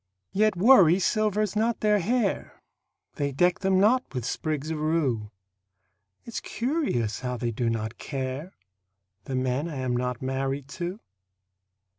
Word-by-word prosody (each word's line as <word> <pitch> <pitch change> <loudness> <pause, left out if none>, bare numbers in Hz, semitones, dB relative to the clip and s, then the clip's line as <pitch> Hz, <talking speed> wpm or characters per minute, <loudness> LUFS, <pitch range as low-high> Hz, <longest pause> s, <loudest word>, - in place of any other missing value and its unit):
Yet 215 +1 +2
worry 185 -4 +7
silvers 210 0 +1
not 225 +2 +1
their 210 -1 +3
hair; 220 +2 -1 0.5
They 140 -1 0
deck 175 +6 +2
them 190 -1 +2
not 230 - +2
with 125 -3 -2
sprigs 155 +2 -2
of 155 - -3
rue. 145 -9 0 1.0
It's 235 - -4
curious 235 - -1
how 125 -1 -3
they 120 -1 -2
do 115 +1 -1
not 110 0 -3
care 135 +5 -5 0.7
The 130 - -3
men 130 +5 0
I 155 - -6
am 130 -2 -1
not 125 -1 -2
married 135 +1 -2
to. 180 +6 -5
155 Hz, 140 wpm, -26 LUFS, 130-210 Hz, 1.0 s, worry